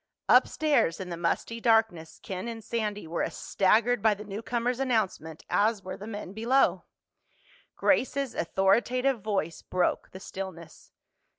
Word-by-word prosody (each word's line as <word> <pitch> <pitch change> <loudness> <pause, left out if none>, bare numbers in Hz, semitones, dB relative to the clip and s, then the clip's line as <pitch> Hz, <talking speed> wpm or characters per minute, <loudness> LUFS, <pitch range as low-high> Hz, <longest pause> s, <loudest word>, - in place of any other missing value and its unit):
Upstairs, 295 - +3
in 185 -2 -6
the - - -2
musty 175 +7 -2
darkness, 225 -9 +1
Ken 190 +3 -5
and 225 -1 -6
Sandy 210 -3 -3
were 165 +1 -3
as - - -3
staggered 225 +4 +2
by 215 -1 +4
the 205 - -9
newcomer's 235 +4 -2
announcement 210 - -1
as 210 -1 +1
were 185 - -6
the 205 - -9
men 205 -3 -6
below. 235 +6 +2 0.9
Grace's 270 -1 +1
authoritative 235 +8 +1
voice 190 -6 -2
broke 180 -1 -1
the 190 - -10
stillness. 190 -4 -8
210 Hz, 135 wpm, -28 LUFS, 185-235 Hz, 0.9 s, by